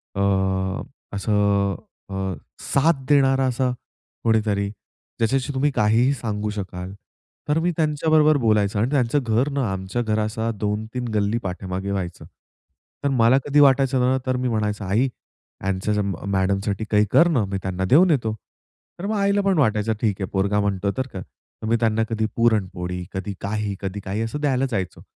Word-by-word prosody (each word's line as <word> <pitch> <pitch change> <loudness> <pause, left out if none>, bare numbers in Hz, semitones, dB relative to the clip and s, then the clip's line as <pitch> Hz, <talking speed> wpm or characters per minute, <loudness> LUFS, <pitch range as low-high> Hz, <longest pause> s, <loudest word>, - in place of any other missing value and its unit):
अ, 100 - -1 0.9
असं 100 0 +1 0.3
अ, 95 -1 -3 0.4
साथ 140 -1 +2
देणारा 135 -2 +4
असा 125 0 0 0.5
कोणीतरी 105 -3 +1
ज्याच्याशी 130 +6 -3
तुम्ही 135 +3 +2
काहीही 115 +6 +3
सांगू 105 -5 -3
शकाल. 95 -2 -6 0.6
तर 155 +2 +3
मी 175 +2 +1
त्यांच्याबरोबर 155 -1 +3
बोलायचो 105 -3 +2
आणि 115 +4 +1
त्यांचं 140 -1 +2
घर 115 +5 +1
ना 140 -1 0
आमच्या 95 +5 -3
घरा 110 -2 0
असं 110 +1 -2
2-3 110 +4 -2
गल्ली 105 +2 +1
पाठीमागे 95 +1 -4
व्हायचं. 95 -3 -4 0.8
तर 140 - +2
मला 125 0 +4
कधी 145 +1 +3
वाटायचं 135 -2 +4
ना, 130 +1 +3
तर 130 -1 0
मी 125 - -1
म्हणायचो 105 -2 -1
आई 105 +8 +2 0.6
यांच्या 95 +2 0 0.3
मॅडम 95 0 +1
साठी 105 +1 -2
काही 105 0 +4
कर 170 - +6
ना, 130 -11 +2
मी 95 0 -3
त्यांना 95 0 -2
देऊन 170 +6 +6
येतो. 115 -7 +1 0.7
तर 190 - -4
मग 215 +1 -1
आईला 200 0 +2
पण 195 -2 +1
वाटायचं 110 -3 +2
ठीक 105 -3 0
आहे 95 - -1
पोरगा 100 +1 +1
म्हणतो 100 -1 0
तर 130 0 -1
का, 95 - -5
तर 110 - -12
मी 115 - +3
त्यांना 110 -1 +2
कधी 110 -1 0
पुरणपोळी, 95 -6 0
कधी 100 +1 -4
काही, 105 0 -2
कधी 100 +1 -4
काही 100 +3 -2
असं 115 +6 -3
द्यायला 135 -2 +1
जायचो. 95 -4 -3
110 Hz, 165 wpm, -23 LUFS, 100-130 Hz, 0.9 s, कर